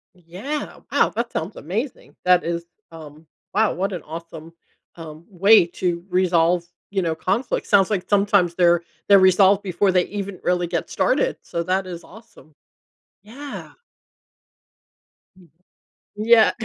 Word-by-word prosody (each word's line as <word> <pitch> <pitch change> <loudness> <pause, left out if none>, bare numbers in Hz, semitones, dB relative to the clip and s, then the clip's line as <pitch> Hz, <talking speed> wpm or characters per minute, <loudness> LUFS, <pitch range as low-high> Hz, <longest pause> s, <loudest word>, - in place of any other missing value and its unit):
Yeah. 185 - -6
Wow, - - +3
that 235 +1 -4
sounds 165 +7 -4
amazing. 215 - -5
That 180 -1 +4
is, 170 0 -3 0.3
um, 155 -1 -13 0.3
wow, 220 +1 +2
what 195 +2 -2
an 175 - -5
awesome, 165 0 -10 0.4
um, 160 -1 -11
way 195 +1 +5
to 175 -1 -3
resolve, 175 -1 +2 0.2
you 195 -1 -1
know, 165 -2 -1
conflict. 195 +10 -2
Sounds 195 -3 +4
like 200 -4 -3
sometimes 200 -4 +2
they're 175 -1 +3 0.3
they're 200 -1 +7
resolved 190 +1 +5
before 190 +1 +1
they 180 -1 +2
even 200 -2 -6
really 180 -1 0
get 170 0 -3
started, - - 0
so 170 - -4
that 185 +2 -1
is 175 -1 -8
awesome. 185 - -17 0.7
Yeah. 270 +8 -9 1.7
Mm. 175 -4 -20 0.7
Yeah. 220 +1 +5
185 Hz, 135 wpm, -22 LUFS, 170-205 Hz, 1.7 s, they're